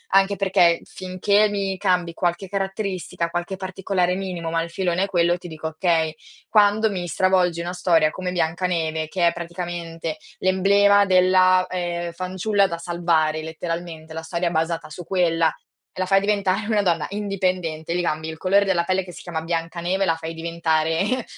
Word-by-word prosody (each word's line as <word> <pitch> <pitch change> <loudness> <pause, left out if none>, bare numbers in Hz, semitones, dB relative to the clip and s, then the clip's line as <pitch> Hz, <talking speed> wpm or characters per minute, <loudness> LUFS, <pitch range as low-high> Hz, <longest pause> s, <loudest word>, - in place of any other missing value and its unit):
Anche 195 +1 +4
perché 180 -3 +3
finché 200 +3 +1
mi 195 -1 -2
cambi 180 -3 +1
qualche 175 +2 -1
caratteristica, 195 -3 -3
qualche 175 +2 -3
particolare 185 -1 -1
minimo, 180 -4 -4
ma 165 0 +1
il 170 - -4
filone 180 0 0
è - - +2
quello, 175 -2 +2
ti 175 -1 -10
dico: 160 0 -5
"Okay". 160 -1 0 0.3
Quando 210 +1 +4
mi 180 -3 -4
stravolgi 180 0 +2
una 175 +1 -3
storia 165 -4 +3
come 180 +2 -4
Biancaneve 160 -2 -1
che 175 -1 +2
è 170 - +2
praticamente 170 -2 -5 0.2
l'emblema 200 +2 +4
della, 185 0 +4
ehm, 175 -1 -3
fanciulla 190 +3 0
da 170 - -4
salvare 165 -2 0
letteralmente, 160 0 -6
la 160 - -5
storia 170 +2 -2
è - - -1
basata 165 0 -1
su 165 +3 -8
quella 165 -3 +1 0.4
e - - -8
la 185 - +1
fai 195 0 +5
diventare 200 -1 0
una 215 -2 +2
donna 170 -4 +1
indipendente, 185 -5 -2
gli 180 - +1
cambi 155 -2 -2
il 160 0 -6
colore 200 +3 +3
della 180 -3 +2
pelle 185 +1 0
che 180 - -10
si - - -11
chiama 165 -3 -4
Biancaneve 170 +3 -1
e - - +3
la 165 - +2
fai 165 0 -6
diventare 165 +7 0
175 Hz, 175 wpm, -23 LUFS, 165-190 Hz, 0.4 s, fai